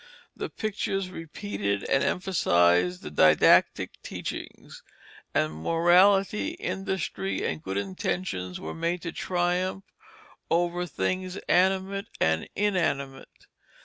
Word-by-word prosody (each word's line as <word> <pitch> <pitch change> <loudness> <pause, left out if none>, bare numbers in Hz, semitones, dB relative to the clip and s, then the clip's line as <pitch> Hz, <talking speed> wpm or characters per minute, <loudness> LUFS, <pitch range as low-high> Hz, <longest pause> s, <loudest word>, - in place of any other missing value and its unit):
The - - -4
pictures 195 -3 -3
repeated 100 - -3
and 135 - +1
emphasized 90 - +2
the 75 - -7
didactic 75 - +4
teachings; - - -7 0.5
and 75 0 0
morality, 185 - +3
industry, 190 - -3
and 80 -1 -2
good 95 +3 -4
intentions 95 - -3
were - - -6
made 170 +1 -2
to 165 - -3
triumph 180 +2 -1 0.7
over 175 +1 +1
things 185 - -2
animate 190 +2 +2
and 80 0 +1
inanimate. 140 -10 -2
175 Hz, 100 wpm, -27 LUFS, -, 0.7 s, didactic